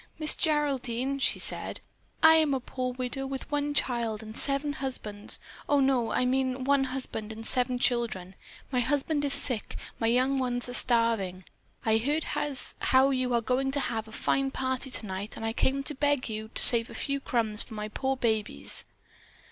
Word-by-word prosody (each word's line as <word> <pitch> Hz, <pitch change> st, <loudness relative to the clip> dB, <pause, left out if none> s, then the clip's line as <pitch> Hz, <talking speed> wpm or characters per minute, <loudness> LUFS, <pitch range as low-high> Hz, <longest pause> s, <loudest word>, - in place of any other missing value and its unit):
"Miss 310 Hz, -1 st, +4 dB
Geraldine," 275 Hz, -4 st, -1 dB
she -, -, +2 dB
said, -, -, -3 dB, 0.4 s
"I 320 Hz, 0 st, +9 dB
am 310 Hz, -3 st, +3 dB
a -, -, -1 dB
poor 255 Hz, 0 st, -4 dB
widow 255 Hz, +2 st, -4 dB
with 270 Hz, +2 st, -6 dB
one 290 Hz, 0 st, -1 dB
child 230 Hz, -5 st, 0 dB
and 220 Hz, 0 st, -9 dB
seven 280 Hz, +2 st, +1 dB
husbands. 220 Hz, -7 st, -6 dB, 0.3 s
Oh, 285 Hz, -, +4 dB
no, 265 Hz, -4 st, +2 dB
I 250 Hz, -, +1 dB
mean 260 Hz, 0 st, 0 dB
one 275 Hz, 0 st, +2 dB
husband 255 Hz, -5 st, -5 dB
and 225 Hz, +1 st, -7 dB
seven 250 Hz, +1 st, +3 dB
children. 235 Hz, -7 st, 0 dB, 0.4 s
My 255 Hz, -, +1 dB
husband 290 Hz, +4 st, 0 dB
is 280 Hz, -1 st, +3 dB
sick, 245 Hz, -6 st, -1 dB, 0.2 s
my 225 Hz, -, +1 dB
young 255 Hz, +3 st, +2 dB
ones 245 Hz, -1 st, -1 dB
are 245 Hz, -, -6 dB
starving. 230 Hz, -7 st, +3 dB, 0.4 s
I 220 Hz, 0 st, +3 dB
heard 290 Hz, +7 st, -1 dB
as 285 Hz, -3 st, +3 dB
how 265 Hz, +1 st, +4 dB
you 255 Hz, -1 st, 0 dB
were 240 Hz, -1 st, +1 dB
going 260 Hz, +3 st, 0 dB
to 285 Hz, -, 0 dB
have 225 Hz, -4 st, -3 dB
a -, -, -12 dB
fine 270 Hz, +4 st, 0 dB
party 260 Hz, 0 st, -2 dB
tonight 205 Hz, -3 st, -4 dB
and 225 Hz, -, -6 dB
I 225 Hz, -, -1 dB
came 275 Hz, +3 st, 0 dB
to 300 Hz, -, 0 dB
beg 285 Hz, -1 st, 0 dB
you 220 Hz, -1 st, -5 dB
to -, -, +5 dB
save 230 Hz, -1 st, +5 dB
a -, -, -10 dB
few 280 Hz, 0 st, -2 dB
crumbs 225 Hz, -5 st, 0 dB
for 220 Hz, -, -4 dB
my 210 Hz, 0 st, -4 dB
poor 265 Hz, +5 st, -2 dB
babies." 220 Hz, -4 st, -1 dB
255 Hz, 190 wpm, -28 LUFS, 225-275 Hz, 0.4 s, I